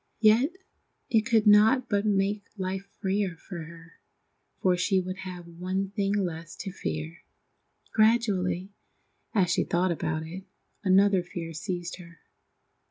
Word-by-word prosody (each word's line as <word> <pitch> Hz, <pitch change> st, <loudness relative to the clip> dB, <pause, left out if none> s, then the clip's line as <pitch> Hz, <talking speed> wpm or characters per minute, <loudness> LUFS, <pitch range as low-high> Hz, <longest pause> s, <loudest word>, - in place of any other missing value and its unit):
Yet 235 Hz, +9 st, +5 dB, 0.6 s
it 220 Hz, -1 st, +3 dB
could 225 Hz, -2 st, +3 dB
not 220 Hz, +5 st, +6 dB
but 205 Hz, -2 st, +1 dB
make 200 Hz, 0 st, +1 dB
life 190 Hz, +1 st, -3 dB
freer 195 Hz, -2 st, 0 dB
for 170 Hz, -1 st, -8 dB
her, 165 Hz, 0 st, -14 dB, 0.6 s
for 185 Hz, -1 st, +3 dB
she 190 Hz, +2 st, +2 dB
would 185 Hz, 0 st, -4 dB
have 185 Hz, -2 st, -7 dB
one 185 Hz, +3 st, -3 dB
thing 200 Hz, -1 st, 0 dB
less 170 Hz, -4 st, -3 dB
to 195 Hz, -, -6 dB
fear. 80 Hz, -, -5 dB, 0.7 s
Gradually, 205 Hz, -4 st, +2 dB, 0.6 s
as 180 Hz, -4 st, +3 dB
she -, -, +2 dB
thought 180 Hz, +1 st, +1 dB
about 160 Hz, 0 st, -2 dB
it, 180 Hz, +4 st, -8 dB, 0.4 s
another 195 Hz, 0 st, +5 dB
fear 170 Hz, -1 st, -6 dB
seized 175 Hz, +1 st, -4 dB
her. 170 Hz, -2 st, -13 dB
190 Hz, 135 wpm, -28 LUFS, 175-205 Hz, 0.7 s, not